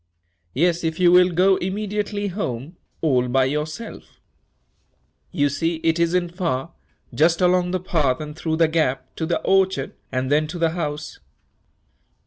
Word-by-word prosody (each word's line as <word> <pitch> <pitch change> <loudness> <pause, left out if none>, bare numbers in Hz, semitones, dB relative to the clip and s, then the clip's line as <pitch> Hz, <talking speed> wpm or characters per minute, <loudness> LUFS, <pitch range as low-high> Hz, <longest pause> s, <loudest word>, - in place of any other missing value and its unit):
"Yes, 170 +4 +1
if 160 +1 -2
you 175 -1 +5
will 180 0 +6
go 185 +2 +3
immediately 205 +1 -2
home 155 - -4 0.3
all 130 -6 +2
by 130 +1 +2
yourself. 150 - -5 1.1
You 145 -1 +2
see 165 +4 -1
it 165 0 +2
isn't 175 +1 +1
far 165 -5 -2 0.4
just 165 +2 +3
along 180 -1 +3
the 185 +1 -1
path 155 -8 0
and 150 -1 -7
through 160 -1 -2
the 165 0 +3
gap, 155 -5 -1
to 160 - -2
the 170 - 0
orchard, 190 -7 +1 0.2
and 130 +1 -2
then 150 +1 +3
to 175 - -6
the 165 -1 +1
house." 155 -3 -4
165 Hz, 150 wpm, -22 LUFS, 150-180 Hz, 1.1 s, will